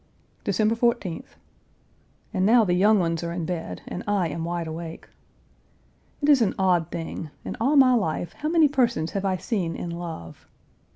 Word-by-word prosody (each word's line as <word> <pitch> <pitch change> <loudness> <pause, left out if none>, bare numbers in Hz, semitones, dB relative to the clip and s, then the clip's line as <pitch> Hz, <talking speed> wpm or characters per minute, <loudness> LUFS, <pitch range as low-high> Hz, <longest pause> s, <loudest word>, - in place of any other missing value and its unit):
December 215 +2 +2
14th. 230 -7 -1 1.0
And 190 -2 0
now 225 +3 +5
the 175 - +1
young 205 +4 +4
ones 165 -2 0
are 170 - -3
in 170 -1 -3
bed 170 -1 -5
and - - -5
I 200 -5 +1
am 165 +2 -4
wide 170 0 -2
awake. 160 +1 -7 1.2
It 290 - +3
is 280 -4 +6
an 215 - +1
odd 180 -4 +2
thing; 165 -2 -5 0.2
in - - -4
all 275 +6 +3
my 265 -2 +7
life 175 -7 -1
how 305 - -3
many 325 -2 +5
persons 240 - +1
have 200 0 -3
I 190 -1 +1
seen 180 -6 -2
in 170 - -5
love? 165 - -8
185 Hz, 175 wpm, -25 LUFS, 170-230 Hz, 1.2 s, my